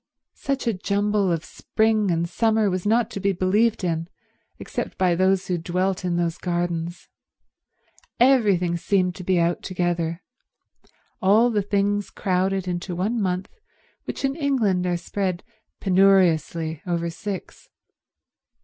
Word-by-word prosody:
Such 275 -1 -2
a 230 - +1
jumble 200 0 0
of 165 -2 -2
spring 220 -2 0
and 170 0 0
summer 220 +2 +1
was 185 +2 -2
not 230 +1 +2
to - - -5
be 195 0 +1
believed 205 +4 +1
in, 165 -1 -1 0.5
except - - -5
by 185 -2 +3
those 190 +2 +2
who 180 -2 -1
dwelt 185 +3 -1
in 180 -1 0
those 170 -1 -1
gardens. 175 -1 -3 1.1
Everything 205 -9 +3
seemed 180 0 +1
to 185 - -9
be 180 0 +2
out 170 0 +1
together—all 185 +4 -2
the 210 -2 +1
things 200 +1 0
crowded 190 0 -1
into 175 0 -3
one 215 +6 -1
month 185 0 -1 0.6
which - - -3
in 270 0 0
England 230 - +1
are 175 -1 0
spread 185 +1 -3 0.4
penuriously 170 -5 +2
over 170 -1 -1
six. 195 +2 -7
185 Hz, 130 wpm, -23 LUFS, 175-205 Hz, 1.1 s, by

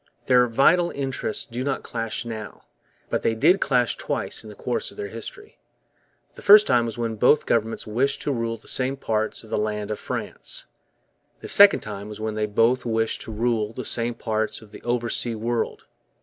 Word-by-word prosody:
Their 125 -1 +5
vital 160 +9 +4
interests 135 -5 -3
do 120 +2 -5
not 135 0 -2
clash 115 0 -4
now. 110 -2 -7 0.5
But - - 0
they 115 - +1
did 170 - +4
clash 125 -3 +2
twice - - -3
in 110 - -10
the 105 - -11
course 125 +4 -2
of - - -16
their 415 0 -4
history. 420 +1 -9 0.7
The - - -13
first 210 +1 +8
time 120 -3 +3
was 115 - -6
when 115 -2 -2
both 135 +7 +4
governments 115 0 0
wished 125 +6 0
to 145 - 0
rule 115 -3 -2
the 110 - -18
same 130 +1 0
parts 110 -4 -1
of 110 - -14
the - - 0
land 105 0 -2
of 105 - -3
France. - - -4 0.8
The - - -7
second 200 0 +7
time 105 -1 -7
was 105 - -8
when 110 0 -2
they 105 0 -1
both 115 +4 +2
wished 115 -1 -1
to - - -7
rule 110 -1 0
the 125 0 -6
same 120 0 -1
parts 110 -2 -2
of 110 -2 -16
the - - -11
oversea 120 -1 -1
world. 115 +2 -2
115 Hz, 195 wpm, -24 LUFS, 110-130 Hz, 0.8 s, first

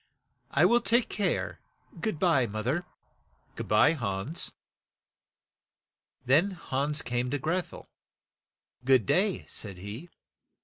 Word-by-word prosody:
"I 150 +5 +4
will 235 +6 +4
take 235 +1 +2
care; 205 - -1 0.4
good 220 -8 -1
by, 150 -8 +3
moth 110 +1 -5
er." 155 +8 0 0.7
"Good - - -5
by, 105 +8 +5
Hans." 115 - -2 1.7
Then 155 +10 +4 0.2
Hans 145 +3 +1
came 125 +1 -1
to 145 - 0
Greth 170 +6 -2
el. - - -11 0.5
" - - -49
Good 130 -4 +4
day, 190 - +1
" - - -29
said 100 -4 -6
he. 105 - -8
140 Hz, 130 wpm, -29 LUFS, 120-175 Hz, 1.7 s, by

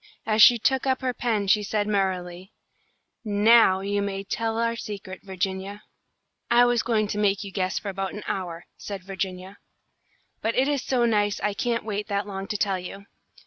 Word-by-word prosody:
As 215 0 +2
she 240 +2 +9
took 265 +4 +1
up 260 0 +1
her 255 -1 -1
pen 225 -5 -1
she 210 +2 +3
said, 210 0 -1
merrily: 190 -2 -2 0.7
"Now 210 -2 +5
you 200 +1 -1
may 195 -1 -3
tell 225 +2 -2
our 230 0 0
secret, 200 -4 -7
Virginia." 190 +1 -4 0.7
"I 240 +1 +6
was 240 -1 +2
going 220 -3 +1
to 210 - -2
make 200 -1 +1
you 200 - -8
guess 185 -1 -1
for 205 - -4
about 195 0 -4
an 210 - -7
hour," 175 -3 -4
said 200 -2 -7
Virginia, 190 0 -5 0.8
"but 225 - -1
it 265 +2 +3
is 290 -2 0
so 245 -2 +1
nice 205 -3 +1
I 210 - 0
can't 230 +1 -1
wait 210 -1 -3
that 200 -1 -1
long 195 -1 -6
to 210 - -2
tell 195 -2 0
you. 195 +2 -9
205 Hz, 185 wpm, -25 LUFS, 195-225 Hz, 0.8 s, she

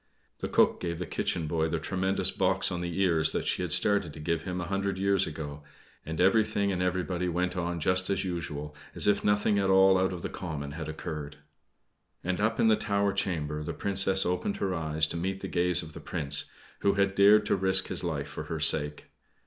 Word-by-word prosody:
The - - -3
cook - - +3
gave 85 -1 -3
the 90 - -4
kitchen 85 0 -2
boy 80 +1 0
the 80 - -1
tremendous 95 +2 +1
box 95 0 +1
on 90 -1 -3
the 85 +1 -4
ear 85 -4 +2
that 80 - +1
she - - 0
had - - -3
started 100 -7 +2
to - - -9
give 85 +2 -1
him 90 -1 -4
a - - -3
hundred 100 +1 -2
years 95 0 +2
ago, 75 -2 -7 0.4
and 80 +1 -6
everything 100 +1 +2
and 90 -1 -2
everybody 90 0 -1
went 90 +1 -1
on 85 -1 -2
just 95 +4 +1
as 95 -1 0
usual, 75 -4 -5 0.2
as - - -1
if 100 -1 +2
nothing 105 0 +2
at 95 -1 +1
all 95 0 +5
out 95 0 +1
of 90 -2 -6
the - - -1
common 75 -5 -5
had 80 +1 -6
occurred. 75 -2 -6 0.9
And 90 +2 -2
up 110 +2 0
in - - +4
the 110 - +5
tower 100 -2 0
chamber 75 -6 -2
the - - -4
Princess 95 -1 +1
opened 90 +3 -1
her 95 -2 -1
eyes 80 -2 +1
to 80 - -4
meet 95 +3 -3
the - - -4
gaze 90 0 +2
of 80 -1 -11
the - - -8
Prince, 70 -2 -2 0.3
who 100 0 +2
had 100 -1 +2
dared 105 +2 +6
to - - +2
risk 95 0 +2
his - - -2
life - - -3
for - - -7
her 80 - -4
sake. 75 -1 +2
90 Hz, 220 wpm, -28 LUFS, 80-95 Hz, 0.9 s, dared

